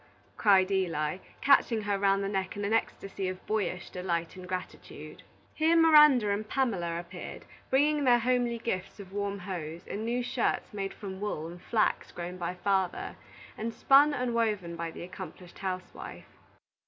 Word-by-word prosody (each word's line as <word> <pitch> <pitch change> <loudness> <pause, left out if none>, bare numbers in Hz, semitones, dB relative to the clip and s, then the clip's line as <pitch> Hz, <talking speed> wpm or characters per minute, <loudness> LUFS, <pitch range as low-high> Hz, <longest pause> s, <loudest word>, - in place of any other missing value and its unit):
cried 195 -3 +4
Eli, 170 -4 0 0.2
catching 240 -5 +4
her 205 -1 0
round 195 0 +3
the - - -1
neck 195 -1 -2
in 205 - -2
an 210 - 0
ecstasy 195 -3 -1
of 185 0 -7
boyish 205 -4 -2
delight 170 -2 -2
and 185 -1 -9
gratitude. 185 0 -7 0.3
Here 320 +2 +3
Miranda 300 -9 +7
and 210 +1 -2
Pamela 190 -11 0
appeared, 175 - -8 0.2
bringing 290 +2 +3
their 245 -2 +6
homely 240 0 +1
gifts 195 -4 -4
of 195 -1 -10
warm 200 0 -2
hose, 175 -3 -6
and 210 - -4
new 240 +2 -1
shirts 245 -3 -1
made 195 -1 -4
from 190 -2 -7
wool 205 -7 -3
and 175 +2 -9
flax 220 -2 0
grown 175 +1 -6
by 175 0 -3
the 180 - -19
father, 190 -3 0 0.4
and 225 +1 -4
spun 285 +2 +6
and 250 -4 -1
woven 210 -7 0
by 170 0 -4
the 165 - -8
accomplished 180 0 -10
housewife. 185 -1 -6
200 Hz, 165 wpm, -29 LUFS, 185-235 Hz, 0.4 s, Miranda